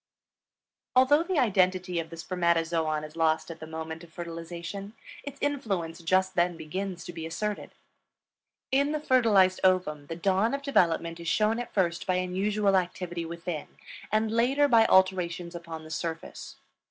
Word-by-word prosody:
Although 260 Hz, +4 st, +6 dB
the 360 Hz, 0 st, -2 dB
identity 185 Hz, -6 st, +2 dB
of 165 Hz, -1 st, -5 dB
the 165 Hz, -, -9 dB
spermatozoon 165 Hz, -3 st, 0 dB
is 155 Hz, +1 st, -9 dB
lost 160 Hz, 0 st, +1 dB
at 165 Hz, -, -9 dB
the 160 Hz, -, -8 dB
moment 160 Hz, +1 st, -6 dB
of 170 Hz, -, -14 dB
fertilization, 170 Hz, +4 st, -7 dB, 0.3 s
its 285 Hz, -1 st, -8 dB
influence 195 Hz, -, -2 dB
just 185 Hz, +3 st, +1 dB
then 175 Hz, -1 st, +1 dB
begins 185 Hz, +3 st, -5 dB
to 175 Hz, -, -7 dB
be 165 Hz, -1 st, -5 dB
asserted. 210 Hz, +5 st, -4 dB, 1.0 s
In 280 Hz, +3 st, +2 dB
the 305 Hz, -, -1 dB
fertilized 220 Hz, -10 st, +4 dB
ovum 180 Hz, -6 st, +2 dB
the 165 Hz, -, -5 dB
dawn 195 Hz, +7 st, +1 dB
of 280 Hz, -, -6 dB
development 170 Hz, -, +1 dB
is 170 Hz, -, -7 dB
shown 215 Hz, +6 st, +2 dB
at 245 Hz, -, -5 dB
first 170 Hz, -4 st, 0 dB
by 185 Hz, -, +2 dB
unusual 195 Hz, +3 st, +1 dB
activity 175 Hz, -2 st, -2 dB
within 170 Hz, -2 st, -5 dB, 0.4 s
and 215 Hz, +1 st, +1 dB
later 260 Hz, +6 st, +3 dB
by 230 Hz, -4 st, +5 dB
alterations 180 Hz, -2 st, +2 dB
upon 165 Hz, -2 st, -7 dB
the 155 Hz, -, -11 dB
surface. 165 Hz, 0 st, -5 dB
180 Hz, 155 wpm, -28 LUFS, 165-210 Hz, 1.0 s, Although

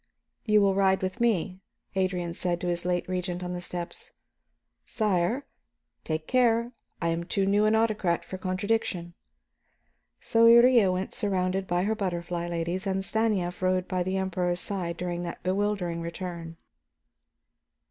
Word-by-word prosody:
"You 210 Hz, -2 st, +5 dB
will 200 Hz, -1 st, +4 dB
ride 190 Hz, -1 st, +2 dB
with 185 Hz, +6 st, -3 dB
me," 195 Hz, -5 st, +1 dB, 0.4 s
Adrian 180 Hz, -2 st, 0 dB
said 175 Hz, 0 st, -1 dB
to 180 Hz, -, -2 dB
his 175 Hz, 0 st, -2 dB
late 180 Hz, -1 st, 0 dB
Regent, 180 Hz, -1 st, -3 dB
on 180 Hz, 0 st, -4 dB
the 175 Hz, -, -4 dB
steps. 175 Hz, -1 st, -6 dB, 0.7 s
"Sire 215 Hz, +4 st, 0 dB, 0.3 s
" -, -, -53 dB
"Take 155 Hz, 0 st, -2 dB
care; 235 Hz, 0 st, +2 dB, 0.3 s
I 170 Hz, -, 0 dB
am 165 Hz, +1 st, -1 dB
too 195 Hz, +3 st, 0 dB
new 205 Hz, +2 st, +3 dB
an 215 Hz, +1 st, +4 dB
autocrat 210 Hz, -7 st, +1 dB
for 185 Hz, +2 st, -7 dB
contradiction." 185 Hz, -2 st, -1 dB, 1.1 s
So 230 Hz, 0 st, +4 dB
Iría 235 Hz, -4 st, +7 dB
went 185 Hz, +1 st, -3 dB
surrounded 190 Hz, -3 st, 0 dB
by 175 Hz, 0 st, +1 dB
her 215 Hz, +3 st, +1 dB
butterfly 175 Hz, -4 st, -3 dB
ladies, 175 Hz, +3 st, -2 dB
and 190 Hz, 0 st, -1 dB
Stanief 205 Hz, -6 st, 0 dB
rode 185 Hz, 0 st, +1 dB
by 185 Hz, -1 st, -1 dB
the 185 Hz, +2 st, -1 dB
Emperor's 180 Hz, -2 st, -1 dB
side 180 Hz, -3 st, -2 dB
during 175 Hz, -1 st, -3 dB
that 170 Hz, -1 st, -6 dB
bewildering 185 Hz, -3 st, -1 dB
return. 170 Hz, -1 st, -6 dB
185 Hz, 150 wpm, -27 LUFS, 175-205 Hz, 1.1 s, Iría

